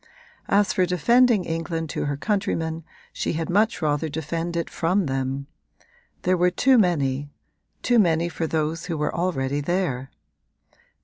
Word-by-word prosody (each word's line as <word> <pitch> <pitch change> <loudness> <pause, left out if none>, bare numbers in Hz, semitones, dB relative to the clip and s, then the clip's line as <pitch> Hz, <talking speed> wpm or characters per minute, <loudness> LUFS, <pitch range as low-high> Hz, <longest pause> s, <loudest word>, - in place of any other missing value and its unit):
As 205 0 +3
for 185 -1 +2
defending 230 +3 +3
England 165 -1 -3
to - - -2
her 145 -1 -2
countrymen 165 -4 -1 0.3
she - - -2
had 165 +1 -2
much 210 -1 +2
rather 150 +1 0
defend 165 +3 -3
it 170 - -1
from 180 +3 0
them: 135 0 -2 0.8
there 185 +1 +3
were 180 0 +3
too 255 +7 +4
many 145 -7 +1 0.5
too 240 -2 +4
many 170 -4 +3
for 165 -1 -3
those 160 +2 -2
who 165 -3 -2
were 150 0 -1
already 145 -5 -1
there. 145 -6 -1
165 Hz, 145 wpm, -24 LUFS, 150-185 Hz, 0.8 s, too